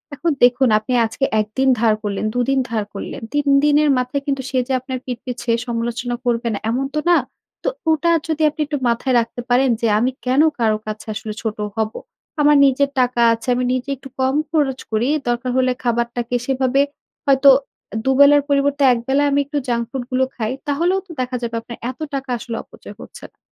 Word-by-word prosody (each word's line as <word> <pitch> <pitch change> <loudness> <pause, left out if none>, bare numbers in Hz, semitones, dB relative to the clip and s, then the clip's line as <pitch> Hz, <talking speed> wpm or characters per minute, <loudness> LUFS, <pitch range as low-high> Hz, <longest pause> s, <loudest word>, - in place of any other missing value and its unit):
এখন 325 +4 0
দেখুন 245 +1 +5
আপনি 220 +4 -4
আজকে 270 +5 -1
১ 215 - 0
দিন 265 0 +4
ধার 225 -1 +4
করলেন 205 0 -2
২ - - +1
দিন 270 0 +2
ধার 220 -2 -1
করলেন 205 +6 -6
৩ 290 0 0 0.2
দিনের 295 0 +4
মাথায় 255 +3 -2
কিন্তু 275 -1 0
সে 265 - -2
যে 265 - -1
আপনার 255 0 -5
পিঠ 250 -2 -4
পিছে 245 -2 -3 0.2
সমালোচনা 240 +1 -2
করবে 235 -1 0
না 200 - -3
এমন 260 +3 -1
তো - - +2
না। 345 - +6 0.5
তো - - +1 0.2
ওটা 315 +2 +2 0.2
যদি 315 -1 -1
আপনি 310 +1 -6
একটু 295 -1 -2
মাথায় 245 +2 0
রাখতে 235 +1 -4
পারেন 255 +2 +3
যে 230 - +2
আমি 250 +3 +1
কেন 260 +3 +3 0.2
কারো 220 -2 +2
কাছে 215 +1 -6
আসলে 215 0 -5
ছোট 220 -2 -3 0.2
হব? 220 -1 0 0.5
আমার 295 0 +5
নিজের 275 +1 +2
টাকা 250 -1 +2
আছে 230 +3 -7
আমি 250 0 0
নিজে 255 +1 -3
একটু 270 +1 -12
কম 260 +1 +1 0.2
খরচ 280 -5 +1
করি 220 +3 +1 0.2
দরকার 240 +1 -1
হলে 255 0 +3
খাবারটাকে 235 0 -1
সেভাবে 265 0 +1 0.4
হয়তো 275 0 +5 0.6
২ 265 - +3
বেলার 285 0 +7
পরিবর্তে 285 0 +2
১ 240 - -2
বেলা 275 +2 +2
আমি 280 - +2
একটু 290 +1 -4
জাঙ্ক 235 -1 0
ফুড 265 0 -4
গুলো 260 +1 +2
খাই। 220 -1 -2 0.2
তাহলেও 340 +7 +1
তো - - -11
দেখা 255 0 -3
যাবে 235 -1 -3
আপনার 235 +1 -9
এত 255 - -19
টাকা 270 -1 -4
আসলে 230 0 -6
অপচয় - - -13
হচ্ছে - - -12
না। - - -47
255 Hz, 205 wpm, -20 LUFS, 235-280 Hz, 0.6 s, বেলার